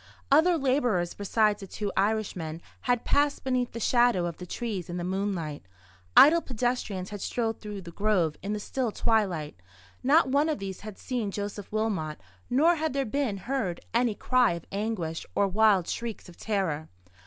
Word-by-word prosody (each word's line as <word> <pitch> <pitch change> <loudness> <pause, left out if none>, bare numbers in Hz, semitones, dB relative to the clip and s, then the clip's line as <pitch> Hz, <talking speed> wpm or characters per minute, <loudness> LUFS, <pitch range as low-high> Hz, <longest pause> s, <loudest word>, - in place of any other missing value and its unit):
Other 330 +4 +5
labourers, 250 - +1
besides 210 +1 +1
the 195 - -8
two 205 +1 -4
Irishmen, 190 -6 -1 0.3
had 245 -2 +2
passed 285 0 +2
beneath 255 -2 0
the 230 - -5
shadow 240 -6 +3
of 170 -2 -4
the 180 - -8
trees 205 -5 -4
in 175 - -4
the 175 - -3
moonlight. 185 -5 -2 0.6
Idle 335 +4 +9
pedestrians 240 - -2
had 205 -2 -6
strolled 225 -2 -1
through 210 -2 -6
the 170 - -9
grove 185 -5 +1
in 200 - -4
the 210 - -1
still 245 +2 -2
twilight; 185 - 0 0.4
not 285 +4 +4
one 285 +4 +2
of 310 - 0
these 195 -2 -6
had 215 -2 -9
seen 240 -5 -2
Joseph 205 0 -5
Wilmot, 205 -8 -1 0.3
nor 315 +7 +4
had 315 -2 -1
there 275 -1 0
been 250 -3 -1
heard 195 -5 -2
any 235 -2 +2
cry 250 -7 +3
of 170 -1 -7
anguish, 195 -6 -2
or 200 - +3
wild 200 -2 +3
shrieks 235 -2 -4
of 175 - -13
terror. 185 -9 -2
210 Hz, 175 wpm, -28 LUFS, 185-245 Hz, 0.6 s, Idle